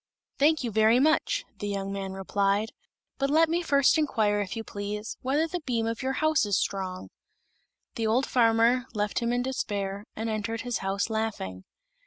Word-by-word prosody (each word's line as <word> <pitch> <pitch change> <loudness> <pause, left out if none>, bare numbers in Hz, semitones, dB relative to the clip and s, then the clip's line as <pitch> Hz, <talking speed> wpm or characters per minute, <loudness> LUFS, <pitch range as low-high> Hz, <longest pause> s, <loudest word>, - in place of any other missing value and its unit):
"Thank 305 +1 +4
you 235 - -2
very 220 +3 +4
much," 310 - +2
the 205 - -3
young 195 -1 -3
man 195 -1 -4
replied; 200 +3 0 0.5
"but 275 0 +1
let 320 +3 +5
me 340 +2 +1
first 280 -1 +3
inquire, 215 -8 +1
if 200 +3 -4
you 225 - -3
please, 210 +1 -5
whether 290 +5 +1
the 355 +2 -3
beam 240 -7 -1
of 230 0 -3
your 265 +1 -1
house 310 0 +2
is 205 -2 +1
strong." 185 -2 -3 0.8
The 225 -1 -1
old 245 +5 +2
farmer 235 +1 +3
left 210 0 0
him 235 0 -1
in 245 0 0
despair, 205 -6 -3
and 225 +1 -3
entered 225 +1 -2
his 245 -3 -2
house 195 +3 -1
laughing. 205 - -3
225 Hz, 180 wpm, -27 LUFS, 205-260 Hz, 0.8 s, let